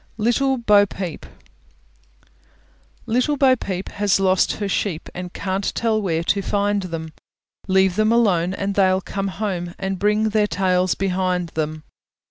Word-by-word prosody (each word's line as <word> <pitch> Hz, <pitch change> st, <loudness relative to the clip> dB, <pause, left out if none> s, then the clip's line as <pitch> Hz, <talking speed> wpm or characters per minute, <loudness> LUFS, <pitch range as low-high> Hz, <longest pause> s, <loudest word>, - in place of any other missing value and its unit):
LITTLE 260 Hz, +4 st, +1 dB
BO 205 Hz, -4 st, +4 dB
PEEP 185 Hz, -4 st, -6 dB, 1.8 s
Little 255 Hz, +6 st, +1 dB
Bo 265 Hz, -2 st, +5 dB
Peep 190 Hz, -5 st, -5 dB
has 205 Hz, -1 st, +1 dB
lost 190 Hz, -1 st, +2 dB
her 205 Hz, -, -3 dB
sheep, 190 Hz, -4 st, -2 dB
And 180 Hz, 0 st, -6 dB
can't 190 Hz, +1 st, -2 dB
tell 220 Hz, -2 st, +1 dB
where 165 Hz, -4 st, -1 dB
to 200 Hz, +3 st, +1 dB
find 205 Hz, +1 st, 0 dB
them; 165 Hz, -3 st, -6 dB, 0.5 s
Leave 190 Hz, -1 st, +3 dB
them 215 Hz, +1 st, +3 dB
alone, 190 Hz, -6 st, +2 dB
and 200 Hz, 0 st, -2 dB
they'll 190 Hz, -1 st, +3 dB
come 195 Hz, +2 st, -4 dB
home, 185 Hz, -3 st, -4 dB
And 190 Hz, -1 st, -3 dB
bring 210 Hz, +2 st, +2 dB
their 210 Hz, -1 st, +2 dB
tails 185 Hz, 0 st, +1 dB
behind 185 Hz, -2 st, -1 dB
them. 155 Hz, -1 st, -4 dB
195 Hz, 145 wpm, -21 LUFS, 180-210 Hz, 1.8 s, Bo